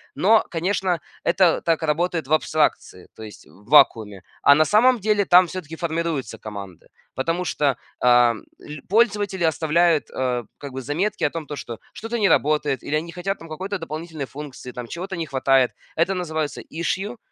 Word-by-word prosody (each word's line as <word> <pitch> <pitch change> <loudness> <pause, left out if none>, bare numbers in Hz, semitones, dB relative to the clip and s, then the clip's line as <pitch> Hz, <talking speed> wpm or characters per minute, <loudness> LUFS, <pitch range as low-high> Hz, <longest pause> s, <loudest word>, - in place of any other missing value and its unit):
Но, 215 +4 +4
конечно, 180 0 -1 0.2
это 185 -3 +3
так 165 -1 0
работает 165 0 0
в 155 - 0
абстракции, 155 - 0
то 110 - -10
есть 105 - -11
в 100 - -20
вакууме. 105 -4 +4 0.2
А 140 - +7
на 155 - +4
самом 235 +5 +4
деле, 205 0 +1
там 180 0 +6
всё-таки 165 -3 -7
формируются 165 - -3
команды, 100 -5 -9 0.3
потому 165 +7 -1
что, 140 -5 0 0.2
а, 120 -1 +5 0.2
ль 150 -2 -9
пользователи 205 -4 +2
оставляют, 160 +1 +2
э, 125 -2 -1
как 140 -2 -8
бы 130 - -5
заметки 165 +11 -2
о 145 - +2
том, 165 -1 -6
то 145 - -5
что 115 -4 -7
что-то 230 +1 -4
не 205 - +4
работает, 145 -3 +1
или 150 - -2
они 155 +2 -1
не - - -8
хотят 190 +3 -3
там 165 -1 -12
какой-то 190 +4 -4
дополнительной 160 -2 -6
функции, 135 -2 -9
там 120 -1 -7
чего-то 185 +6 -6
не 165 - -2
хватает. 135 -2 +2 0.2
Это 170 +4 +1
называется 160 -5 -3
issue. 195 +8 -3
160 Hz, 175 wpm, -22 LUFS, 135-180 Hz, 0.3 s, А